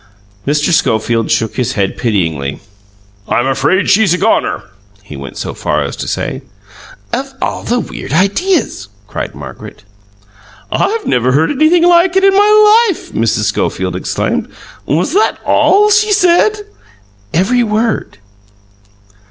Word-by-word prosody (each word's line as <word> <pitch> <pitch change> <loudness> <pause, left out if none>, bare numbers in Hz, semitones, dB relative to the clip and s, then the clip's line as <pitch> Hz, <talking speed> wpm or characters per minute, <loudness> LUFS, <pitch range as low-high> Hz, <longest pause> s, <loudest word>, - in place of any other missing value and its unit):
Mr. 150 +3 +1
Schofield 115 -4 +1
shook 110 -1 -1
his 125 -3 -1
head 100 -2 -1
pityingly. 80 - -2 0.7
"I'm 120 - 0
afraid 160 +8 +1
she's 195 -3 +3
a - - -3
goner," 215 +4 0 0.4
he 75 - -10
went 70 0 -9
so - - -5
far - - -1
as - - -5
to - - -5
say. - - -3 0.7
"Of 270 +1 -4
all - - -3
the 245 +1 -1
weird - - -7
ideas!" 200 - 0 0.2
cried 105 - -6
Margaret. 70 -3 -10 0.9
"I 445 - +1
never 125 +1 +1
heard 155 +4 +2
anything 310 +4 +3
like 350 +1 +4
it 385 - +3
in 390 0 +5
my 425 +3 +5
life!" 370 - -5
Mrs. 115 -1 0
Schofield 95 -3 -2
exclaimed. 90 - -2 0.4
"Was 175 - 0
that 420 +3 +2
ALL 420 +2 +3
she 420 +1 +3
said?" 395 +2 +3 0.7
"Every 200 +10 +1
word!" 220 0 -1
195 Hz, 135 wpm, -13 LUFS, -, 0.9 s, in